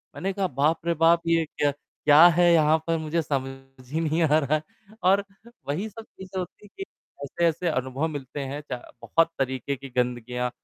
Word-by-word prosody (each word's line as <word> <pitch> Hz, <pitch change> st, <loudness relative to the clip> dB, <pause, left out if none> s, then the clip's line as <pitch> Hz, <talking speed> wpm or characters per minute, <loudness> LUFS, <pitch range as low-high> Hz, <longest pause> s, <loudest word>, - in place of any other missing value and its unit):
मैंने 190 Hz, +7 st, -2 dB
कहा, 195 Hz, -1 st, 0 dB
"बाप 150 Hz, +2 st, +1 dB
रे, 170 Hz, -, +2 dB
बाप! 165 Hz, +1 st, +4 dB
ये 165 Hz, -1 st, +3 dB
क्या 145 Hz, -1 st, 0 dB
क्या 145 Hz, +2 st, +4 dB
है 175 Hz, -1 st, +5 dB
यहाँ 155 Hz, -1 st, +4 dB
पर 165 Hz, -, +1 dB
मुझे 160 Hz, +1 st, -1 dB
समझ 135 Hz, -2 st, -6 dB
ही 155 Hz, -, -1 dB
नहीं 160 Hz, +1 st, 0 dB
आ 155 Hz, 0 st, +4 dB
रहा 145 Hz, +1 st, +1 dB
है।" 155 Hz, -, -1 dB, 0.4 s
और 195 Hz, +2 st, +4 dB, 0.4 s
वही 180 Hz, +10 st, -2 dB
सब 225 Hz, +2 st, -10 dB
चीज़ 190 Hz, -2 st, -10 dB
होती 185 Hz, +3 st, -6 dB
कि 390 Hz, -, -8 dB, 0.4 s
ऐसे-ऐसे 170 Hz, +4 st, 0 dB
अनुभव 130 Hz, +1 st, -1 dB
मिलते 145 Hz, -2 st, -6 dB
हैं 140 Hz, +1 st, -4 dB
चा -, -, -2 dB, 0.2 s
बहुत 165 Hz, +9 st, +2 dB
तरीके 130 Hz, +1 st, -2 dB
की 135 Hz, +1 st, -10 dB
गंदगियाँ 125 Hz, 0 st, -1 dB
155 Hz, 185 wpm, -25 LUFS, 135-170 Hz, 0.4 s, है